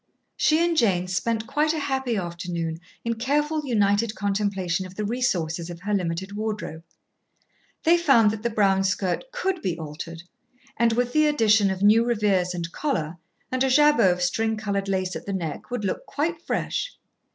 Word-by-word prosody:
She 310 - +3
and 340 -1 0
Jane 185 - +2
spent 220 +5 -1
quite 300 +6 +1
a 315 - -2
happy 265 -4 -1
afternoon 170 -2 -4 0.3
in 230 - +1
careful 295 +6 0
united 210 -1 +2
contemplation 195 -3 -1
of 185 - -14
the 210 - -2
resources 175 -8 -1
of 170 -1 -8
her 210 +2 -2
limited 185 0 -2
wardrobe. 210 -7 -4 1.0
They 335 +2 +5
found 265 -11 +5
that 215 -1 -5
the 235 - 0
brown 195 -3 +2
skirt 190 - -1
could 385 -8 -2
be 175 -3 -2
altered, 165 +2 -7 0.5
and, 235 0 +3
with 245 +1 0
the 305 0 +4
addition 220 -8 +4
of 190 0 -2
new 215 +3 +6
revers 205 -6 +1
and 170 -1 -4
collar 175 - -2 0.3
and 255 0 +1
a 265 - +2
jabot 295 -6 +5
of 180 0 -1
string 220 +5 0
coloured 200 -2 -2
lace 185 -1 -1
at - - -7
the 200 - -2
neck, 165 -5 -4
would 245 -4 -3
look 190 - -3
quite 325 +3 -2
fresh. - - -3
210 Hz, 175 wpm, -25 LUFS, 180-250 Hz, 1.0 s, new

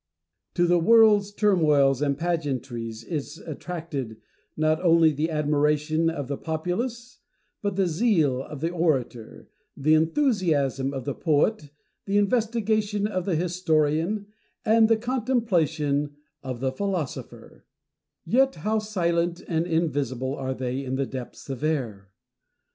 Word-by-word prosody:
To 175 - +3
the 175 0 +3
world's 210 +1 +5
turmoils 150 - +3
and 140 -2 0
pageantries 130 -9 -3
is 150 +2 -5
attracted, 155 -8 -6 0.4
not 155 0 +1
only 165 -2 +5
the 155 +3 -1
admiration 150 +1 +1
of 145 -5 -4
the 140 0 -4
populace, 225 +10 -4 0.4
but 200 -2 -2
the 195 0 +2
zeal 160 - +2
of 145 +1 -9
the 165 +1 -1
orator, 135 -10 -2 0.3
the 155 +2 +3
enthusiasm 160 - +1
of 135 -3 -5
the 140 - -2
poet, 150 - +1 0.4
the 200 +1 +1
investigation 215 -1 +1
of 185 -4 -2
the 185 - 0
historian, 170 +2 0 0.4
and 220 0 +5
the 225 - +4
contemplation 175 - 0 0.3
of 130 -3 -6
the 130 -1 0
philosopher: 180 -1 -5 0.6
yet 265 +8 +3
how 220 +1 +2
silent 175 -4 -1
and 165 0 0
invisible 140 -6 -1
are 130 -2 -3
they 130 +1 -3
in 130 0 -3
the 135 0 0
depths 130 -2 -8
of 135 0 -6
air 115 -11 -2
160 Hz, 130 wpm, -25 LUFS, 140-200 Hz, 0.6 s, world's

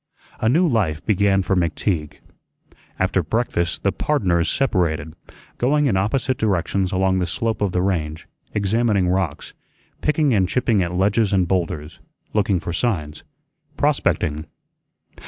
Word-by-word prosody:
A 110 - +2
new 170 +8 +3
life 100 - 0
began 100 -2 +2
for 95 +2 0
McTeague. 85 -2 -1 0.8
After 95 0 +1
breakfast 85 -2 -1
the 100 - +2
"pardners" 90 - +1
separated, 85 - 0 0.4
going 145 +4 +2
in 120 -8 +2
opposite 125 +6 0
directions 95 -2 0
along 95 0 +1
the 90 - -1
slope 110 +5 -2
of 100 -3 +1
the 90 0 0
range, 80 -5 -2 0.2
examining 105 -2 +1
rocks, 90 -5 -2 0.5
picking 150 -3 +2
and 95 -4 +2
chipping 115 -5 +1
at 85 -1 -1
ledges 100 +4 +1
and 95 -3 +2
bowlders, 80 -4 -2 0.3
looking 100 -3 +2
for 85 -1 -5
signs, 80 -8 -2 0.5
prospecting. 75 +1 0
95 Hz, 135 wpm, -21 LUFS, 85-110 Hz, 0.8 s, new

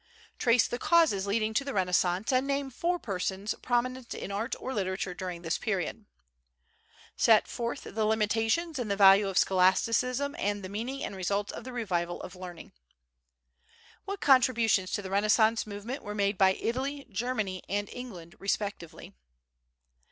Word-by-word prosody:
Trace 235 0 +4
the 240 - -4
causes 300 - +3
leading 215 +2 0
to 255 - +1
the 275 -1 -5
Renaissance 180 +2 +1
and 255 +2 +2
name 275 -1 -1
four 345 +8 0
persons 195 - -3
prominent 255 0 -1
in - - -6
art 220 +5 -2
or 265 - -4
literature 190 -3 -2
during 180 -2 -6
this 165 0 -1
period. 205 +1 -2 1.1
Set 220 -2 +5
forth 240 +3 -4
the 220 - -3
limitations 225 +9 +1
and 235 -4 -3
the 200 - +1
value 195 0 +7
of 190 -1 -2
scholasticism 230 +9 +2
and 205 0 -1
the 185 - -6
meaning 240 +7 -4
and - - -4
results 200 +2 -1
of - - -8
the 255 - -6
revival 180 -8 -2
of 180 - -8
learning. 180 -2 -9 1.3
What 395 0 -5
contributions 235 -8 +4
to 205 - -1
the 190 - -7
Renaissance 215 +3 +3
movement 215 +7 -6
were 210 0 -6
made 200 0 +1
by 190 0 +4
Italy, 270 +7 -3
Germany 205 -4 -2
and 205 +1 -1
England 190 -9 -9
respectively? 200 -4 -4
210 Hz, 155 wpm, -29 LUFS, 190-250 Hz, 1.3 s, value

